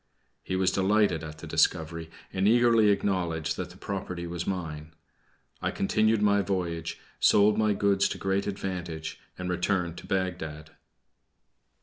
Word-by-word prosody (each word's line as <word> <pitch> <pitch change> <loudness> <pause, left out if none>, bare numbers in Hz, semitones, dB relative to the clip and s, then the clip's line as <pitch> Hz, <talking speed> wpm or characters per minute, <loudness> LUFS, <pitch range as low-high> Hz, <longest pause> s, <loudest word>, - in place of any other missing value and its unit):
He 95 - -3
was 95 0 +2
delighted 95 -4 +2
at 75 0 -7
the - - -9
discovery, 80 0 0 0.2
and 95 +1 +2
eagerly 115 -1 +5
acknowledged 85 -5 0
that 90 -1 -4
the 90 - -14
property 90 -3 -4
was 85 0 -4
mine. 80 -4 -4 0.7
I - - 0
continued 110 +2 +2
my 100 0 +4
voyage, 85 -4 -3 0.2
sold 105 +1 +5
my 110 -1 +2
goods 100 -1 +2
to - - -4
great 95 +1 0
advantage, 90 -5 -4 0.2
and 90 - -4
returned 90 -1 -1
to - - -12
Bagdad. 80 -5 -3
95 Hz, 140 wpm, -28 LUFS, 85-100 Hz, 0.7 s, eagerly